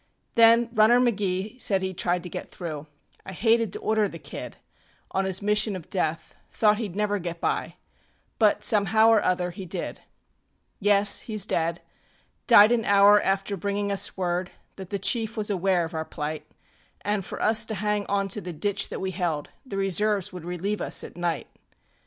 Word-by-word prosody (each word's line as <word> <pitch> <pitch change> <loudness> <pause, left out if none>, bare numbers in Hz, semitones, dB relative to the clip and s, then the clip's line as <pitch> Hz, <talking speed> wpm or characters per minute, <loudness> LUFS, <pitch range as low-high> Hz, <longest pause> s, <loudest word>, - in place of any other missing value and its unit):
Then 230 0 +5
Runner 225 +2 +5
McGee 210 -1 -1
said 195 -5 +1
heŌĆÖd 190 -1 -3
try 180 -1 +1
to 180 0 -8
get - - -7
through. 155 -4 -7 0.4
I 190 - -8
hated 225 +2 +2
to - - -4
order 215 -1 +1
the 165 - -9
kid - - -8 0.5
On 195 0 0
his 190 +1 -3
mission 210 0 +2
of 175 -4 -10
death; 160 -3 -2
thought 210 -1 +2
heŌĆÖd 210 -6 -5
never 205 0 0
get 170 -1 -5
by, - - -2 0.6
But 215 -2 +3
somehow 220 +1 +3
or 225 -2 +5
other 180 -1 0
he 185 +1 -9
did. - - -5 0.8
ŌĆ£Yes, 200 0 +3
heŌĆÖs 215 -3 0
dead. 170 +1 -1 0.7
Died 215 -2 +8
an 235 -2 +2
hour 205 +1 +6
after 195 +1 -1
bringing 200 +2 -2
us 200 0 -1
word 180 0 -1 0.3
That 190 -2 -9
the 200 - -2
chief 220 +4 +1
was 210 -1 -2
aware 185 -2 +1
of 165 - -9
our 160 0 -2
plight, 150 -1 -5 0.6
AnŌĆÖ 205 -1 0
for - - -7
us 220 +1 +3
to 220 - -5
hang 210 0 -1
onto 200 0 -1
the 180 - -6
ditch 200 +5 0
that - - -6
we 190 0 -2
held; 170 -6 -3
The 205 -7 -7
reserves 195 0 0
would 180 -2 -8
relieve 180 +4 -3
us - - 0
at - - -10
night. 175 -1 -2
200 Hz, 180 wpm, -25 LUFS, 180-210 Hz, 0.8 s, Died